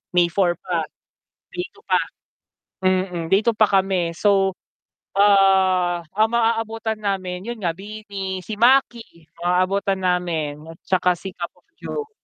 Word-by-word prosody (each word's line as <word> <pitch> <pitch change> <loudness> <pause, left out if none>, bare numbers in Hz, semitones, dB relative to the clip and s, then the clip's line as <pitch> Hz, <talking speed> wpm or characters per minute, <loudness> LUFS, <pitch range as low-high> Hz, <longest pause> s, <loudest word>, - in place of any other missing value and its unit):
May 175 -1 +4
4 175 -1 +2
pa, 170 -4 -3 0.7
day 355 - -2
2 415 +2 -23
pa, - - +3 0.9
mm, 185 -2 0
day 195 - +6
2 230 0 +1
pa 215 - +5
kami 190 -4 +1
so, 195 0 +2 0.6
ah, 190 -3 +4
ang 215 +2 +3
maabutan 225 -1 0
namin 190 -2 -3
yun 240 - -3
nga 170 - +1
BINI, 195 -1 -6
si 215 - -6
Maki 235 - +2
maabutan 185 +3 +1
namin 170 -5 -1
at 165 - -10
tsaka 180 -1 +2
si 190 +3 -8
Cup 170 - -5
of - - -28 0.2
Joe. 445 -1 -5
190 Hz, 140 wpm, -22 LUFS, 180-215 Hz, 0.9 s, day